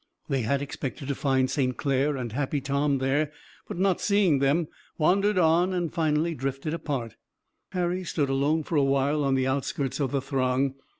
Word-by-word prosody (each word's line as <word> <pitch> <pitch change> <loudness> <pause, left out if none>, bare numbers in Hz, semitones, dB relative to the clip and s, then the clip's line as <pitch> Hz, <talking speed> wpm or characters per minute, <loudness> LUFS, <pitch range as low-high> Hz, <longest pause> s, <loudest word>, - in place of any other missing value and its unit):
They 135 -3 +1
had 140 +5 0
expected 135 -1 -5
to - - +1
find 135 -2 +1
St. 130 -2 -1
Clair 140 +1 +1
and 120 -3 -4
Happy 140 +4 -1
Tom 140 +1 0
there, 140 +3 0 0.4
but - - -6
not 190 -1 +1
seeing 200 -8 +3
them, 145 +4 +2 0.3
wandered 195 +5 +3
on 175 +2 +3
and 175 -3 -2
finally 160 +1 +1
drifted 135 +2 -3
apart. 135 -9 -4 0.6
Harry 180 0 -1
stood 155 -4 -1
alone 140 +4 +1
for 160 - -1
a 145 - +4
while 140 +2 +2
on 135 -1 +2
the 130 -1 +1
outskirts 135 +1 -2
of 140 -3 0
the 140 - +1
throng. 130 0 0
140 Hz, 180 wpm, -27 LUFS, 135-160 Hz, 0.6 s, a